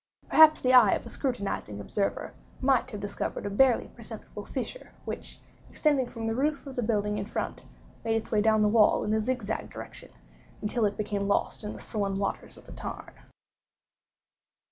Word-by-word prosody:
Perhaps 315 -1 +7
the 255 0 +3
eye 245 -6 +8
of - - -2
a - - -8
scrutinizing 200 - -3
observer 195 - -2 0.3
might 260 -1 +2
have 210 -5 -6
discovered 205 0 -4
a 205 - -2
barely 250 +3 +4
perceptible - - -9
fissure, - - -6
which, - - -6 0.3
extending 280 -5 +1
from 230 -2 -6
the 225 - 0
roof 285 +5 0
of 270 -2 -8
the 245 - 0
building 210 -2 0
in 200 - -3
front, 220 - -4 0.4
made 225 -1 +1
its 225 - -3
way 215 -2 +3
down 220 0 +4
the - - +4
wall 210 0 +4
in 210 - 0
a 220 - +2
zigzag 225 -2 -2
direction, - - -9 0.5
until 215 +2 0
it 205 0 -1
became 205 -1 -2
lost 200 - 0
in 210 - -4
the - - -9
sullen 200 -3 -2
waters 195 0 -3
of - - -15
the - - -12
tarn. - - -7
220 Hz, 185 wpm, -28 LUFS, 205-255 Hz, 0.5 s, eye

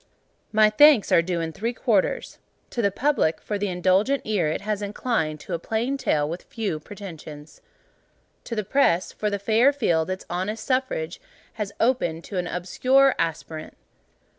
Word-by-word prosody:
My 215 0 +5
thanks 290 -1 +6
are - - +6
due 170 0 -2
in 165 0 -3
three 230 +7 -2
quarters. 225 -5 0 0.3
To 240 - -1
the 200 - +3
Public, 220 - +1
for 205 -1 -4
the 205 - -1
indulgent 190 +9 +2
ear 205 -7 +1
it 155 - -2
has 210 0 -2
inclined 200 -7 -2
to 185 - -7
a 170 - -1
plain 225 +9 -1
tale 150 - 0
with 170 +3 -5
few 205 -9 -4
pretensions. 160 -5 -10 0.8
To 230 - -4
the 215 - -1
Press, 185 -6 +2
for 210 - -2
the 200 - -1
fair 220 +7 +3
field 175 - 0
its 185 0 -4
honest 210 +6 -3
suffrage 255 - -1 0.4
has 200 -1 -2
opened 200 -10 +1
to 190 - -4
an 180 - -2
obscure 255 +11 +3
aspirant. 160 -1 -4
200 Hz, 165 wpm, -24 LUFS, 170-230 Hz, 0.8 s, thanks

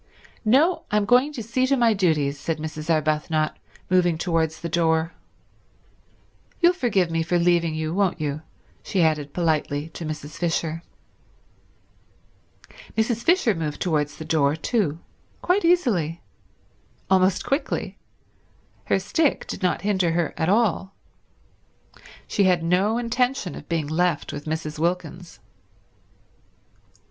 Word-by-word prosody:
"No, 280 +11 +3
I'm 210 -1 +1
going 250 +7 +4
to 240 -6 -5
see 255 +4 0
to 275 +1 +2
my 235 -2 +4
duties," 150 -7 +1
said 165 +2 -2
Mrs. 155 0 -6
Arbuthnot, 155 0 +1 0.3
moving 175 -2 +2
towards 160 -2 -1
the 170 - -4
door. 165 0 +1 1.5
"You'll 350 0 +5
forgive 200 - +1
me 165 0 0
for 175 +2 +1
leaving 170 -2 +2
you, 155 0 -2
won't 190 -2 +1
you," 150 0 -3 0.4
she 190 -4 0
added 150 -3 0
politely 155 -3 -1
to 165 - -8
Mrs. 155 -1 -6
Fisher. 165 -1 -1 2.2
Mrs. 225 +1 +1
Fisher 340 - +3
moved 155 -4 -4
towards 150 -4 -1
the 160 - -7
door 150 -2 +2
too; 160 - -1 0.5
quite 375 +3 +2
easily; 225 - +1 0.9
almost 185 0 +3
quickly; 275 +3 -2 0.9
her - - +2
stick 320 -4 0
did - - -6
not 180 -1 0
hinder 190 -5 +1
her 170 -1 0
at 160 +1 0
all. 200 -2 +1 1.3
She 200 - +1
had 180 -3 +3
no 190 +6 +2
intention 245 - -1
of - - -11
being 165 -3 0
left 165 +1 0
with 145 - -7
Mrs. 155 -1 -4
Wilkins. 175 - -3
170 Hz, 130 wpm, -24 LUFS, 155-210 Hz, 2.2 s, You'll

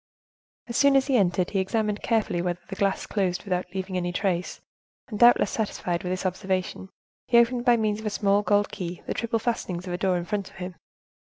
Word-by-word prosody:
As 235 - -7
soon 280 -1 +5
as 270 -1 +4
he 275 - +1
entered, 180 -4 +2
he 195 - +1
examined 210 +2 -1
carefully 215 -6 0
whether 175 0 -2
the 195 - -6
glass 195 0 0
closed 185 -4 -1
without 180 -3 -2
leaving 190 -1 -3
any 175 0 -1
trace, 180 -1 -1 0.5
and, 210 -3 -5
doubtless 240 0 +6
satisfied 180 -5 -2
with 180 - -4
his 185 +1 -3
observation, 190 0 -2 0.4
he 235 - +4
opened 240 +1 +3
by 240 -2 +5
means 215 -1 0
of 220 - -4
a - - +1
small 200 -1 +2
gold 205 0 +2
key 175 -1 -6
the - - -2
triple 230 -1 -1
fastenings 215 -6 -3
of 180 - -4
a 175 - -3
door 185 -1 +2
in 175 - -4
front 205 0 -3
of - - -20
him. 180 0 -6
195 Hz, 215 wpm, -26 LUFS, 180-220 Hz, 0.5 s, doubtless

